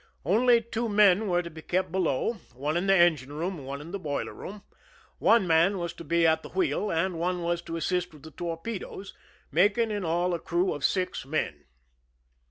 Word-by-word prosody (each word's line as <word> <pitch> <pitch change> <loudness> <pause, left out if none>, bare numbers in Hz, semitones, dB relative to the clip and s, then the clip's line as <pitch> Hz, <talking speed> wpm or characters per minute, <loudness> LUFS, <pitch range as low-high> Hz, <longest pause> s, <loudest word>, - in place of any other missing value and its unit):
Only 235 - +4
two 230 +1 -3
men 205 0 +4
were 175 -1 +1
to 170 - -8
be 160 0 -10
kept 185 +1 -1
below, 185 - 0 0.2
one 145 +5 -2
in 175 +3 0
the 195 - +5
engine 160 -7 +3
room 170 +3 -3
and 135 - -10
one 140 +1 -5
in 165 +3 -10
the 200 - -4
boiler 145 -5 -3
room. 205 +1 -9 0.6
One 230 -4 +4
man 170 +4 +3
was 170 -1 -3
to - - -10
be 170 +2 +2
at 160 0 +3
the - - -10
wheel 325 - 0
and 165 +1 -1
one 180 +1 -1
was 170 0 -1
to 165 -1 -5
assist 180 +2 -1
with 150 -3 -16
the 160 - -10
torpedoes, 175 +5 -6 0.4
making 205 +8 +3
in 205 -2 -2
all 175 +2 0
a 170 - -1
crew 175 +3 0
of 145 - -7
six 185 -1 0
men. 150 +4 -3
175 Hz, 205 wpm, -27 LUFS, 160-195 Hz, 0.6 s, the